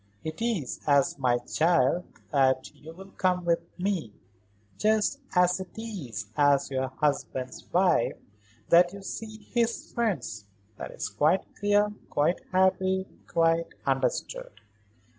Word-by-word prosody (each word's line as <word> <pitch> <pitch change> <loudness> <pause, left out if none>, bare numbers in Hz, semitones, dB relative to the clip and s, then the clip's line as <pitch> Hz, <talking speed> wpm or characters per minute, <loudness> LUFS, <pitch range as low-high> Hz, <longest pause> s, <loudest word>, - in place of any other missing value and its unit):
It 160 +6 -6
is 220 - -1
as 140 -1 +3
my 125 -2 +3
child 160 +4 +2 0.3
that 130 -3 +2
you 160 - -11
will 190 +3 -12
come 180 -2 0
with 170 -1 +3 0.2
me; 180 - -1 0.7
just 220 +5 +2 0.2
as 180 0 +4
it 190 +2 -9
is 145 - -5
as 145 -1 +3
your 130 0 0
husband's 130 -2 -2
wife 175 -7 +3 0.5
that 175 +1 +6
you 200 -1 -9
see 215 +2 -7
his 235 -1 0
friends. 165 - -2 0.3
That - - -6
is - - -4
quite 150 - +2
clear, 205 +1 +2 0.2
quite 150 +5 +1
happy, 190 0 +2 0.2
quite 165 0 +2 0.2
understood." 130 -5 -2
170 Hz, 125 wpm, -28 LUFS, 135-190 Hz, 0.7 s, that